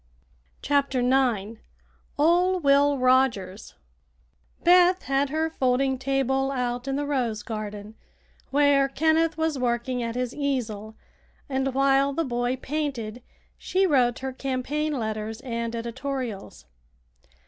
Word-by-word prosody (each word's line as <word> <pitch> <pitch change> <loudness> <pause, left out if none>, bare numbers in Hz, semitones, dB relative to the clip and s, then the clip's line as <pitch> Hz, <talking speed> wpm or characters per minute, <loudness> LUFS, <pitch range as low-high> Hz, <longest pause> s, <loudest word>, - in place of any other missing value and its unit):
CHAPTER 280 -2 +1
IX 240 -4 +1 0.6
OL' 350 +5 +3
WILL 285 -1 +3
ROGERS 255 -7 +1 0.9
Beth 360 +1 +5
had 275 +1 0
her 315 +2 -1
folding 265 -1 +1
table 270 0 0
out 250 -1 -2
in 270 - -1
the 290 +1 -1
rose 240 -7 -1
garden 210 -1 -6 0.6
where 280 -1 +3
Kenneth 320 +2 +1
was 320 -3 -1
working 245 0 -1
at 230 0 -3
his 250 0 -2
easel, 225 -7 -3 0.5
and 265 -1 -1
while 275 +1 +3
the 330 +3 -1
boy 245 0 -1
painted 260 -5 -4 0.4
she 380 +1 +1
wrote 250 -8 +2
her 265 0 -5
campaign 275 +4 -2
letters 220 -3 -4
and 235 -2 -4
"editorials." 240 -2 -5
265 Hz, 115 wpm, -25 LUFS, 240-285 Hz, 0.9 s, Beth